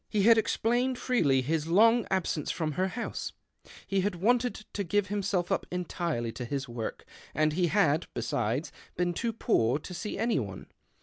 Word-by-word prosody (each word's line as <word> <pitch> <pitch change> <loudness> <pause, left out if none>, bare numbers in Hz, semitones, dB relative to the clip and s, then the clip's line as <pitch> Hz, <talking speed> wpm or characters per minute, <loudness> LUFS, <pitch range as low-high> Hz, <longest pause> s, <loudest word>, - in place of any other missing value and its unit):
He 210 -3 +1
had 230 +2 +8
exphiined 240 +3 +1
freely 150 - +2
his 155 +3 -1
long 225 +6 +5
absence 180 -6 -1
from 160 -2 -1
her 185 +6 0
house 230 +5 -4 0.3
— - - -43 0.2
he 195 -1 +1
had 200 -1 -1
wanted 240 +7 +2 0.2
to 200 - -1
give 205 +3 0
himself 200 -3 -1
up - - 0
entirely 170 -9 -2
to 125 - -6
his 140 +2 -3
work; 120 -2 -5 0.3
and 155 +1 +2
lie 180 0 +2
had, 165 -4 +2
besides, 115 +5 -1 0.3
been 175 0 +1
too 230 +6 -1
poor 140 - +2
to 170 +4 -9
see 210 +4 -4
any 225 -2 +1
one. 95 -6 -6
180 Hz, 180 wpm, -29 LUFS, 150-215 Hz, 0.3 s, had